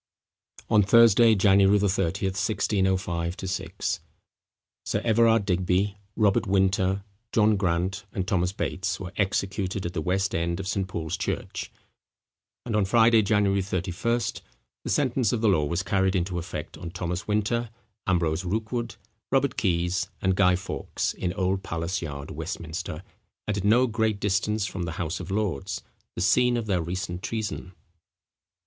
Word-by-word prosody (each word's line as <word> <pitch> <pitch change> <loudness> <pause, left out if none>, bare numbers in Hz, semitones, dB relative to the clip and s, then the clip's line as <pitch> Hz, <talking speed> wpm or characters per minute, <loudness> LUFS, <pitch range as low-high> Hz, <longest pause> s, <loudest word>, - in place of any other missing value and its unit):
On 110 -2 +5
Thursday, 115 +2 +6
January 100 0 +5
30, 95 -2 0
1605 95 -3 0
6, 95 -1 -3 0.8
Sir - - -1
Everard 115 -2 +4
Digby, 95 +2 0 0.2
Robert 105 0 +2
Winter, 95 0 +2 0.3
John 110 -1 +4
Grant, 95 +1 -1
and 95 -2 -3
Thomas 90 -3 +1
Bates, 100 0 -2
were 95 0 -7
executed 95 -1 -1
at 85 - -3
the 80 - -2
west 95 +4 0
end 85 +1 -1
of 95 - -4
St. 95 0 -1
Paul's 80 -4 -3
church; - - -4 0.9
and 115 -3 -2
on 105 - +3
Friday, 115 +2 +5
January 100 -2 +2
31st, 95 +5 -2 0.4
the - - -5
sentence 130 -6 +1
of 115 - -1
the 115 - +3
law 80 -7 +3
was 85 +5 -1
carried 95 0 +1
into 90 0 -1
effect 85 -3 -6
on 85 - -6
Thomas 90 0 -4
Winter, 110 +3 0 0.4
Ambrose 85 -2 +1
Rookwood, 110 +5 -2 0.4
Robert - - +2
Keys, 90 +2 0
and 95 -1 +1
Guy 90 -2 +4
Fawkes, 95 +1 -3
in 90 - -2
Old 95 0 0
Palace 85 +3 -3
yard, 70 -3 -6
Westminster, 80 0 -5 0.4
and 105 - 0
at - - -4
no 115 +5 +5
great 110 -3 0
distance 105 +1 0
from 95 -3 -5
the 80 - -4
House 80 +1 -3
of - - -7
Lords, 100 -7 -2 0.3
the - - -3
scene 125 +6 +3
of 115 - -2
their 95 -5 +1
recent 90 +1 -4
treason. 105 -4 -4
95 Hz, 150 wpm, -26 LUFS, 90-105 Hz, 0.9 s, Thursday